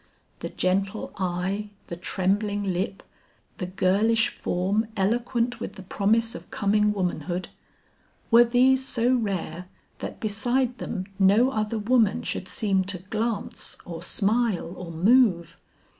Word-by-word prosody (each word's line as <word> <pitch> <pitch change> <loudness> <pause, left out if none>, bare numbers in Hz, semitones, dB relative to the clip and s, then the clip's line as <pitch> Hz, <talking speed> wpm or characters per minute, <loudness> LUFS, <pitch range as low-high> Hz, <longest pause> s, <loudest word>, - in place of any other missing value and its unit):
The - - -5
gentle 195 +3 -1
eye, 190 +3 -2 0.2
the 170 - -6
trembling 205 +4 0
lip, 190 0 -2 0.6
the 180 - -3
girlish 205 +5 +2
form 195 +5 -1
eloquent 235 +4 0
with - - -5
the 190 - -10
promise 225 +4 +1
of - - -10
coming 210 +1 +2
womanhood, 180 -2 -2 0.8
were 235 +1 +9
these 255 +2 +3
so 245 -1 +1
rare, 185 -7 -2 0.3
that - - -6
beside 240 +4 0
them 190 -4 -4
no 210 +7 +5
other 215 -1 -1
woman 220 -1 +2
should 185 - -3
seem 190 +1 +1
to 190 -1 -3
glance 215 +4 -3
or 170 -2 -7
smile 205 -2 0
or 175 -2 -7
move? 175 -3 +3
205 Hz, 130 wpm, -26 LUFS, 185-230 Hz, 0.8 s, were